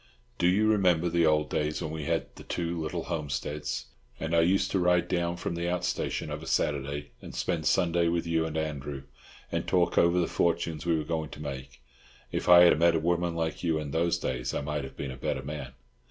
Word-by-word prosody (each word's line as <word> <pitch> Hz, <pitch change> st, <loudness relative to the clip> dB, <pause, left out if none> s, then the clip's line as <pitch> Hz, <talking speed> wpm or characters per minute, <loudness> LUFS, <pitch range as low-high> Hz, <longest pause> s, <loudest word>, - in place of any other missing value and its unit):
Do 90 Hz, -, +3 dB
you 100 Hz, +4 st, +3 dB
remember 90 Hz, -5 st, +3 dB
the 85 Hz, -1 st, +3 dB
old 75 Hz, -1 st, +2 dB
days 75 Hz, 0 st, -1 dB
when 75 Hz, -, -4 dB
we 80 Hz, -2 st, -5 dB
had -, -, -1 dB
the -, -, -11 dB
two 85 Hz, -1 st, -3 dB
little 80 Hz, -, -3 dB
homesteads, 75 Hz, -1 st, -3 dB, 0.3 s
and 80 Hz, +1 st, -1 dB
I 85 Hz, -, +5 dB
used 90 Hz, +4 st, +2 dB
to 95 Hz, -, +2 dB
ride 90 Hz, -1 st, +3 dB
down 85 Hz, -1 st, -1 dB
from 85 Hz, -, -3 dB
the 85 Hz, +1 st, -2 dB
out 90 Hz, -1 st, -1 dB
station -, -, -2 dB
of -, -, -4 dB
a -, -, -9 dB
Saturday 70 Hz, -1 st, -1 dB
and -, -, -9 dB
spend 85 Hz, -4 st, -1 dB
Sunday 85 Hz, -2 st, +2 dB
with 85 Hz, 0 st, 0 dB
you 85 Hz, -1 st, +1 dB
and 80 Hz, 0 st, -4 dB
Andrew, 70 Hz, -3 st, -4 dB, 0.5 s
and -, -, -2 dB
talk 90 Hz, -1 st, +3 dB
over 85 Hz, +1 st, +4 dB
the 85 Hz, -, +2 dB
fortunes 85 Hz, -2 st, -1 dB
we 85 Hz, -1 st, +3 dB
were 80 Hz, -, -2 dB
going 80 Hz, -1 st, -3 dB
to -, -, -10 dB
make? 70 Hz, -2 st, -7 dB, 0.5 s
If -, -, -2 dB
I 90 Hz, 0 st, +10 dB
had 85 Hz, -3 st, +6 dB
met 85 Hz, 0 st, +5 dB
a -, -, +2 dB
woman 85 Hz, +1 st, 0 dB
like 80 Hz, -1 st, -2 dB
you 80 Hz, -2 st, +1 dB
in 75 Hz, -2 st, -4 dB
those 85 Hz, +3 st, +1 dB
days 60 Hz, -1 st, -3 dB
I -, -, -1 dB
might 75 Hz, -1 st, -3 dB
have 65 Hz, -, -11 dB
been 70 Hz, -2 st, -4 dB
a 65 Hz, -, -8 dB
better 65 Hz, 0 st, -2 dB
man. 70 Hz, -3 st, -6 dB
80 Hz, 225 wpm, -28 LUFS, 75-85 Hz, 0.5 s, I